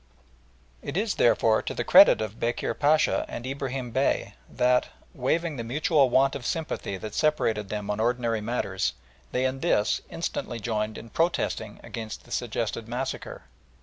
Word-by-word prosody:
It 140 - -4
is, 210 +1 +1
therefore, 115 -2 +3
to - - -5
the - - -1
credit - - +7
of 110 0 -5
Bekir 120 0 -1
Pacha 150 +4 +3
and 120 - -6
Ibrahim 130 -2 -4
Bey 135 +4 0 0.2
that, 125 0 +2 0.3
waiving 160 +4 -1
the 115 - -3
mutual 145 +3 +2
want 135 +2 +3
of 140 - -5
sympathy 135 -9 -3
that 105 +3 -7
separated 115 -10 +1
them 105 -1 -4
on 105 - -3
ordinary 115 -1 0
matters, 105 -4 -1 0.4
they 130 +1 0
in 130 +1 -1
this 135 -9 +1
instantly 120 - -4
joined 110 -1 -2
in 115 - -10
protesting 165 -10 -1
against 110 -2 -7
the - - -18
suggested 115 -1 -2
massacre. 125 +3 -4
120 Hz, 155 wpm, -26 LUFS, 110-135 Hz, 0.4 s, credit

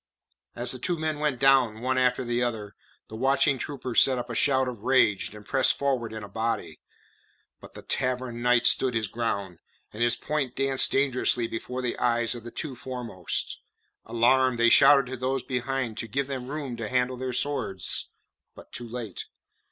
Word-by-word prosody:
As 120 +1 +4
the 130 - -1
two 175 +6 -1
men 155 -1 -2
went 150 -4 -1
down, 130 -5 +4
one 130 +2 0
after 125 0 +1
the 120 0 -1
other, 110 -4 -3 0.3
the 110 - -9
watching 135 +2 +2
troopers 130 -4 0
set 130 -2 +3
up 120 0 -5
a - - -4
shout 130 +2 +2
of 120 -5 -6
rage, 120 -5 +2
and 105 -1 -12
pressed 135 +2 +2
forward 130 -5 -1
in 110 -1 -7
a - - -7
body. 105 -6 -3 0.8
But - - -14
the - - -11
Tavern 125 -2 -2
Knight 125 -1 +3
stood 130 -2 +2
his 110 -1 +1
ground, 100 -5 -3 0.3
and 110 - -7
his 120 0 +3
points 140 -2 -3
danced 135 -1 +2
dangerously 130 -3 +2
before 125 +3 -5
the 120 - -2
eyes 120 -1 +1
of 120 -2 -8
the 120 - -7
two 135 +2 -5
foremost. 120 -8 -4 0.4
Alarmed, 125 +2 +2
they 115 0 +5
shouted 140 +3 +7
to 130 +1 -6
those 130 +1 -2
behind 125 -2 -3
to 115 - -4
give 135 +5 -1
them 130 -2 -5
room 140 -3 -5
to 110 -2 -5
handle 125 0 0
their 130 0 -3
swords; 120 -8 -1 0.5
but - - -14
too 120 -1 -6
late. 115 -2 -6
125 Hz, 185 wpm, -26 LUFS, 115-130 Hz, 0.8 s, shouted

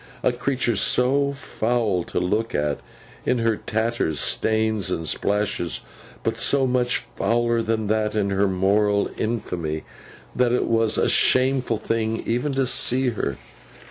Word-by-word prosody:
A - - +3
creature 125 -1 -1
so 135 +7 +2
foul 115 -8 -1
to - - -2
look 105 +6 -1
at, 75 -1 0 0.4
in 125 - +1
her 115 -1 +1
tatters, 110 -9 -1
stains 110 -3 0
and 80 0 -3
splashes, 100 -4 -1 0.4
but - - -1
so 140 -1 +3
much 125 -1 0
fouler 115 +2 +1
than 110 -1 -1
that 110 0 0
in 100 -2 0
her 100 +1 +2
moral 100 +2 +2
infamy, 85 -9 -3 0.5
that 125 -1 +2
it 125 - +1
was 115 -1 +2
a - - +2
shameful 130 -3 +2
thing 110 +1 -2
even 125 +5 0
to 135 0 +1
see 125 +1 +2
her. 70 - -3
110 Hz, 140 wpm, -23 LUFS, 100-125 Hz, 0.5 s, A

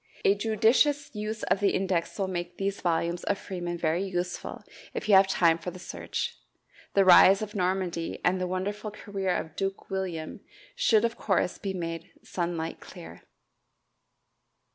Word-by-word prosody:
A 195 - +6
judicious 225 +8 +2
use 215 +1 -4
of - - +1
the 200 -1 +2
index 185 -3 -1
will 195 -2 0
make 175 -1 -4
these 200 +1 -2
volumes 170 0 0
of 200 - +1
Freeman 175 -3 -5
very 165 +1 0
useful 180 -2 -4 0.3
if - - -4
you 210 - +4
have 190 0 +7
time 170 -3 +3
for 175 - -5
the 180 - -9
search. 180 - -5 0.6
The 195 -1 +5
rise 190 +2 +8
of 210 - -6
Normandy 180 -3 -1
and 185 +1 +2
the 180 - 0
wonderful 205 +4 -3
career 200 -3 -3
of 160 - -4
Duke 195 0 -4
William 180 -5 -4 0.4
should 220 -1 +3
of 230 0 -2
course 190 -3 0
be 195 -1 -3
made 165 -2 -5
sunlight 170 -2 -3
clear. - - -11
190 Hz, 160 wpm, -28 LUFS, 175-200 Hz, 0.6 s, rise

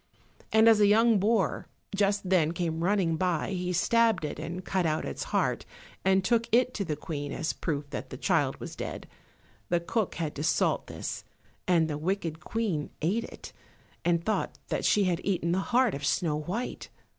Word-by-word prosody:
And 220 +1 +5
as 225 -2 +7
a 205 - +6
young 220 +1 +5
boar 210 0 +1 0.3
just 200 -1 +1
then 170 -4 +3
came 165 -2 -2
running 180 -4 +2
by 180 0 0
he 180 -1 -2
stabbed 225 +2 +3
it, - - -5
and 180 +2 -5
cut 190 -2 0
out 155 0 -1
its - - -4
heart - - 0 0.4
and 190 0 +3
took 230 +2 +2
it 250 +2 +3
to 200 - -2
the 160 -5 -2
Queen 145 -1 -5
as 160 -1 -2
proof 145 -3 -3
that - - -5
the - - -7
child - - +1
was - - -7
dead. - - -6 0.6
The 175 - +2
cook 200 +4 -1
had 160 -3 -3
to 145 - -3
salt 160 - +1
this, - - -5 0.4
and 170 -3 +4
the 150 -1 -3
wicked 165 -2 -2
Queen 185 -5 -2
ate 210 +8 +1
it, - - -11 0.5
and 170 -1 +1
thought 215 - -1 0.2
she 205 - +3
had 180 -3 0
eaten 175 -4 0
the 185 - +2
heart 245 -2 +3
of 140 - -5
Snow 155 +2 +1
white. 190 +11 -4
180 Hz, 185 wpm, -28 LUFS, 160-210 Hz, 0.6 s, as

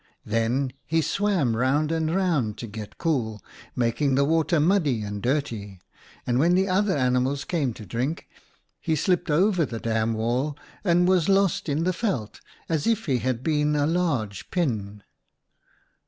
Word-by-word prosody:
Then 115 +5 0 0.2
he 165 +1 +2
swam 165 - +1
round 140 +6 +1
and 160 0 0
round 150 - 0
to - - -6
get 105 -1 -8
cool, 120 -10 -1 0.4
making 125 +3 +1
the 140 +1 +3
water 160 +2 +2
muddy 150 - +2
and 105 0 -5
dirty, 115 -8 -2 0.5
and 120 0 +1
when 170 +5 +4
the 190 +1 +2
other 190 -1 +1
animals 130 +2 +1
came 150 -8 0
to 105 - -10
drink, 125 - -3 0.5
he 160 - 0
slipped 180 +3 0
over 180 +3 +3
the 115 -6 -4
dam 115 0 0
wall 125 +6 -1 0.3
and 175 -2 +3
was 185 -2 +3
lost 195 -4 +2
in 150 +3 0
the 185 - +2
veld 165 - -3 0.3
as 160 -3 -1
if 225 -1 +1
he 130 -5 +1
had 130 -1 -2
been 150 -1 +1
a 145 -1 +2
large 145 - -1
pin. 105 - -2
145 Hz, 160 wpm, -25 LUFS, 115-170 Hz, 0.5 s, when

